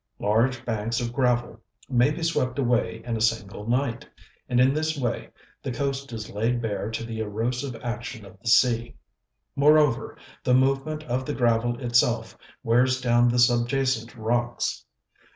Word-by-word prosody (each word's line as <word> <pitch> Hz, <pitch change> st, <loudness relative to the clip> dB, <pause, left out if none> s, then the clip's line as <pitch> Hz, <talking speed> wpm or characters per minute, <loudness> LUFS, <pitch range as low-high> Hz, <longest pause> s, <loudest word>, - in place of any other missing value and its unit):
Large 120 Hz, +4 st, +1 dB
banks 115 Hz, 0 st, -1 dB
of 120 Hz, -1 st, -3 dB
gravel 120 Hz, -3 st, 0 dB, 0.3 s
may 125 Hz, 0 st, +3 dB
be 160 Hz, +3 st, -4 dB
swept 130 Hz, -6 st, 0 dB
away 120 Hz, -3 st, 0 dB
in 120 Hz, -1 st, -2 dB
a 110 Hz, -, -3 dB
single 105 Hz, -2 st, -1 dB
night, 125 Hz, +1 st, 0 dB, 0.5 s
and 125 Hz, -1 st, +2 dB
in 130 Hz, +2 st, +5 dB
this 155 Hz, +1 st, -1 dB
way 120 Hz, -4 st, -2 dB, 0.3 s
the 135 Hz, -, -4 dB
coast 140 Hz, +1 st, -3 dB
is 110 Hz, -3 st, -6 dB
laid 115 Hz, +4 st, 0 dB
bare 110 Hz, -2 st, -3 dB
to 110 Hz, +1 st, -4 dB
the 115 Hz, -1 st, -6 dB
erosive 120 Hz, +5 st, -2 dB
action 120 Hz, -1 st, -5 dB
of 95 Hz, -1 st, -15 dB
the 115 Hz, -, -11 dB
sea. 115 Hz, 0 st, +3 dB, 0.6 s
Moreover, 145 Hz, -3 st, +3 dB, 0.3 s
the 125 Hz, -, +3 dB
movement 135 Hz, +4 st, +1 dB
of 125 Hz, -1 st, -2 dB
the 145 Hz, +2 st, -4 dB
gravel 120 Hz, -1 st, +1 dB
itself 120 Hz, -2 st, +1 dB, 0.3 s
wears 125 Hz, +3 st, +3 dB
down 120 Hz, -1 st, +3 dB
the 120 Hz, 0 st, +1 dB
subjacent 120 Hz, 0 st, +2 dB
rocks. 120 Hz, -, -1 dB
120 Hz, 155 wpm, -25 LUFS, 115-130 Hz, 0.6 s, in